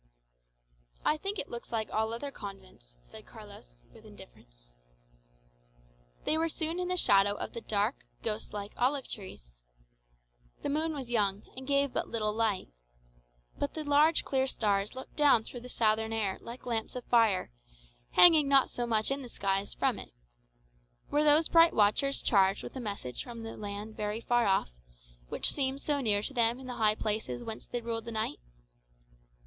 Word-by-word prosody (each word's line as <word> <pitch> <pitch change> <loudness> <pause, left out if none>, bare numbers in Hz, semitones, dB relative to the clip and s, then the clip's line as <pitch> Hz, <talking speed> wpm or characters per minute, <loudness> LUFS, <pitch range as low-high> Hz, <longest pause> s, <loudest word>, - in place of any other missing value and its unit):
"I 300 - +3
think 395 +6 -3
it - - -4
looks 235 - -7
like 220 -2 -2
all 220 +1 0
other 275 +5 -5
convents," 195 - -11
returned - - -13
Carlos, - - -13
with - - -16
indifference. - - -16 1.5
They 315 - +1
were 330 0 +1
soon 325 +2 -1
in 360 - -2
the 365 0 -1
shadow 200 - +5
of - - -6
the 235 - -6
dark, 210 +3 -1 0.2
ghost 215 -1 -3
like 205 0 -6
olive 265 +2 +1
trees. - - -7 1.0
The - - -1
moon 315 +2 -1
was 260 -4 -6
young, 205 -3 +1
and 260 0 -8
gave 280 -1 +1
but - - -1
little 215 -2 -1
light; 220 -3 -1 0.9
but 285 - -2
the 310 - -3
large 300 +2 +4
clear 265 -1 0
stars 205 -3 0
looked 260 - -10
down 285 -7 +5
through 245 - -8
the 250 +1 -11
southern 220 -1 +1
air 205 -4 -2
like 235 +2 -9
lamps 230 -1 -2
of 250 - -6
fire, 225 - +2 0.6
hanging 315 -5 +8
not 275 -1 +4
so 240 -1 -3
much 220 +1 +1
in 275 +1 -2
the 250 - -9
sky 195 -3 0
as 200 - -7
from - - 0
it. - - -9 1.0
Were 295 +1 +3
those 305 +2 +6
bright 330 0 +5
watchers 220 +7 +3
charged 195 -2 +3
with - - -9
a - - -4
message 200 - -4
from 235 -2 -9
the 225 - -7
land 205 +1 -6
very 210 +2 -3
far 240 -1 +2
off, 190 - +1 0.6
which - - +3
seemed 270 -1 -1
so 285 -1 -1
near 210 -4 +1
to 275 - -1
them 235 0 +2
in 265 - -10
the 250 -1 -6
high 215 -1 +3
places 210 - -3
whence 220 -1 -7
they 240 - -4
ruled 230 -1 -4
the 235 - -6
night? 220 -1 -3
230 Hz, 180 wpm, -30 LUFS, 205-275 Hz, 1.5 s, hanging